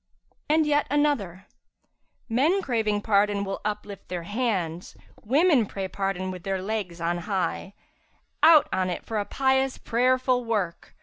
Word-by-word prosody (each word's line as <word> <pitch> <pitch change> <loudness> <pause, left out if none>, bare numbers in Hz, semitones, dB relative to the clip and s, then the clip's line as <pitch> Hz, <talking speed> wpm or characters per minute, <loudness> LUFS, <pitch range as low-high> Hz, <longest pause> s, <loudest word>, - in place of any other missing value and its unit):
And 310 +1 +4
yet 295 0 +1
another, 250 - 0 0.8
'Men 300 +12 +2
craving 215 -4 0
pardon 205 -1 +2
will 195 0 -4
uplift 210 -1 -5
their 175 -2 -4
hands; 185 -5 -3
* - - -27
Women 275 - +3
pray 195 -1 -4
pardon 190 -1 -3
with 180 -1 -8
their 195 +1 -2
legs 190 -3 -4
on 170 +1 -1
high: 190 0 -3 0.7
Out 315 -2 +7
on 185 -1 0
it 175 - -5
for 220 -2 -2
a 205 - -2
pious, 265 +1 +1
prayerful 255 +1 +1
work! 205 -7 -3
210 Hz, 145 wpm, -26 LUFS, 190-255 Hz, 0.8 s, Out